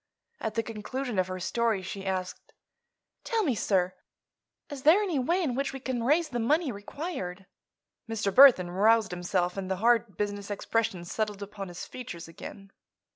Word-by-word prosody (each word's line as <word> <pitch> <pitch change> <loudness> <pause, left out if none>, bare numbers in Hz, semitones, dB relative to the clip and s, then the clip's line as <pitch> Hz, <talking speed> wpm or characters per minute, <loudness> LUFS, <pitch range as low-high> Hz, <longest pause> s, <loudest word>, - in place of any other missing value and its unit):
At 220 - -3
the 225 - +1
conclusion 225 +1 -4
of 185 - +2
her 185 0 -5
story 220 +1 0
she 195 +1 -6
asked: 185 -1 -4 0.7
"Tell 455 -2 0
me, 285 -9 +2
sir, 190 -4 +1 0.8
is 280 -2 -6
there 315 +8 +6
any 350 -9 0
way 345 +9 +1
in 275 -7 0
which 275 +2 -2
we 270 - -5
can 255 -2 -2
raise 305 +7 +2
the 245 - -2
money 290 +5 +2
required?" 200 - -6 0.6
Mr. 205 -3 -1
Burthon 245 -10 +8
roused 215 +2 +4
himself 180 +1 -1
and 190 -1 -4
the 190 - +1
hard 230 -1 +2
business 205 -1 -3
expression 205 -2 -1
settled 210 +2 -3
upon 200 -1 -7
his 175 -1 -7
features 200 -11 -8
again. 195 +4 -10
215 Hz, 170 wpm, -28 LUFS, 190-255 Hz, 0.8 s, Burthon